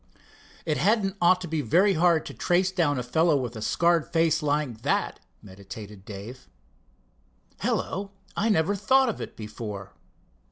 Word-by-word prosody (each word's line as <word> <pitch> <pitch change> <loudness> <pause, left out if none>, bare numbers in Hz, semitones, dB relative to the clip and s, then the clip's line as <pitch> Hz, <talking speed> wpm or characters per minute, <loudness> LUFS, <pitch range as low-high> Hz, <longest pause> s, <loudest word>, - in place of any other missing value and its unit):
"It 155 -3 0
hadn't 200 -1 +2
ought 180 +1 +4
to 180 - -5
be 160 -1 -1
very 180 - +3
hard 170 -1 +3
to - - -7
trace 180 +2 +1
down 165 -7 +1
a 125 - -2
fellow 160 +5 +2
with 125 -3 -4
a 110 - -6
scarred 170 +8 +1
face 165 -1 +2
like 145 -6 -1
that," - - 0 0.2
meditated 100 +1 -11
Dave. 110 +5 -9 1.1
"Hello! 195 +1 -2 0.3
I 225 - +1
never 195 0 +2
thought 260 +6 +3
of 225 - -4
it - - -7
before." 105 -3 -7
160 Hz, 155 wpm, -26 LUFS, 115-185 Hz, 1.1 s, ought